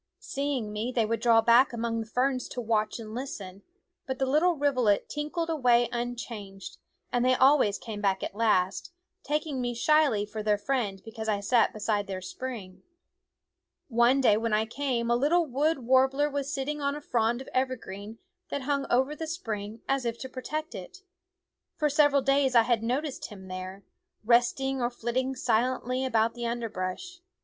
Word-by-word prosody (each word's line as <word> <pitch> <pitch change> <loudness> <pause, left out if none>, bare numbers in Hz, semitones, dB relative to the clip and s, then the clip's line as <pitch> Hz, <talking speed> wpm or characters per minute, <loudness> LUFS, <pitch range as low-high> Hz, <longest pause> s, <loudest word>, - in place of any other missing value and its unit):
Seeing 270 -6 -3
me 220 +4 -2
they 235 -3 +1
would 225 0 -1
draw 230 -1 +5
back 240 +3 +5
among 230 -1 -2
the 225 - -5
ferns 255 +2 0
to 250 - -5
watch 215 -2 0
and 220 -2 -8
listen; 200 -7 -6 0.5
but 260 -1 -3
the 265 - +1
little 310 +7 +3
rivulet 255 -8 +2
tinkled 305 +3 -3
away 245 -6 +3
unchanged, 230 -5 -6 0.3
and 245 0 +1
they 255 0 +4
always 260 -6 +4
came 215 -3 -7
back 195 -2 +1
at - - -4
last, 205 - +1 0.3
taking 295 -2 -2
me 245 -1 -2
shyly 280 -5 +3
for 215 +1 -6
their 210 -1 +2
friend 205 -5 -2
because 220 -1 -5
I 205 -1 +1
sat 225 +3 +3
beside 210 -1 -1
their 190 -1 -4
spring. 195 -1 -7 1.1
One 240 +3 +4
day 215 -5 +5
when 225 0 -1
I 215 +1 +2
came 235 -1 -2
a - - +4
little 315 +7 +3
wood 285 0 0
war 260 +2 +5
bler 290 +2 0
was 285 0 -2
sitting 295 +1 -3
on 280 0 0
a 295 - -7
frond 235 -3 0
of 265 - -9
evergreen 225 -5 -3 0.3
that 280 - -3
hung 280 0 -1
over 265 +4 +2
the 320 +1 -5
spring 220 - -5
as 270 -1 +1
if 235 -1 -2
to 260 - -4
protect 305 +6 -5
it. 385 +1 -9 0.7
For 300 -2 +1
several 290 -1 +4
days 275 -1 +2
I 230 - +7
had 235 -1 +1
noticed 260 +5 -2
him 190 -3 -11
there, 185 +2 -7 0.4
resting 250 +3 +2
or 240 - +1
flitting 250 +2 -2
silently 255 +1 0
about 230 -3 +1
the 240 -1 -4
underbrush. 230 - -4
245 Hz, 175 wpm, -28 LUFS, 220-275 Hz, 1.1 s, I